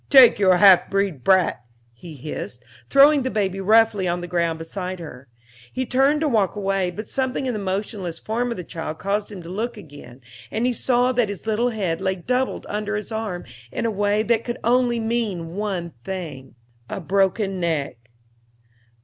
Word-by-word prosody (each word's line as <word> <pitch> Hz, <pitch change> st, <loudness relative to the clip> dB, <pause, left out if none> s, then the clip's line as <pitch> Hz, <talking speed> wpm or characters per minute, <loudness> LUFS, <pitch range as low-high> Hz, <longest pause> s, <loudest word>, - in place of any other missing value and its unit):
"Take 265 Hz, -6 st, +8 dB
your 185 Hz, -3 st, +5 dB
half 195 Hz, -2 st, +7 dB
breed 195 Hz, -9 st, -1 dB
brat," 185 Hz, -9 st, +3 dB, 0.3 s
he 155 Hz, +7 st, -11 dB
hissed, 130 Hz, -3 st, -7 dB, 0.3 s
throwing 280 Hz, +1 st, +6 dB
the 260 Hz, -, -1 dB
baby 195 Hz, -4 st, -1 dB
roughly 215 Hz, -1 st, +4 dB
on 175 Hz, 0 st, 0 dB
the 175 Hz, -, -6 dB
ground 170 Hz, -2 st, 0 dB
beside 180 Hz, +3 st, -5 dB
her. 140 Hz, -5 st, -10 dB, 0.4 s
He 260 Hz, -, -2 dB
turned 270 Hz, +4 st, +2 dB
to 315 Hz, -, +2 dB
walk 215 Hz, -8 st, +1 dB
away, 195 Hz, -2 st, 0 dB
but 210 Hz, +4 st, -7 dB
something 265 Hz, 0 st, -1 dB
in 255 Hz, -, -1 dB
the 215 Hz, -, -3 dB
motionless 190 Hz, -3 st, -3 dB
form 235 Hz, +6 st, -2 dB
of 235 Hz, -, -4 dB
the 180 Hz, -, -5 dB
child 160 Hz, -1 st, -6 dB
caused 205 Hz, +2 st, -2 dB
him 190 Hz, -4 st, -8 dB
to 165 Hz, -, -9 dB
look 225 Hz, +5 st, -3 dB
again, 145 Hz, -8 st, -12 dB, 0.3 s
and 225 Hz, +2 st, -1 dB
he 250 Hz, -, +2 dB
saw 245 Hz, +1 st, +2 dB
that 245 Hz, -4 st, +1 dB
his 200 Hz, +1 st, -7 dB
little 225 Hz, +3 st, +1 dB
head 190 Hz, -7 st, -2 dB
lay 190 Hz, 0 st, 0 dB
doubled 250 Hz, +8 st, -2 dB
under 210 Hz, 0 st, -3 dB
his 210 Hz, +2 st, -5 dB
arm 220 Hz, -5 st, -4 dB, 0.3 s
in -, -, -3 dB
a 230 Hz, -, +1 dB
way 205 Hz, +1 st, +1 dB
that 230 Hz, 0 st, +1 dB
could 240 Hz, -, -4 dB
only 240 Hz, 0 st, +2 dB
mean 220 Hz, -8 st, -2 dB
one 190 Hz, -5 st, -3 dB
thing 150 Hz, -9 st, -6 dB, 0.3 s
a -, -, -4 dB
broken 195 Hz, +2 st, 0 dB
neck. 140 Hz, -9 st, -2 dB
200 Hz, 185 wpm, -23 LUFS, 175-230 Hz, 0.4 s, Take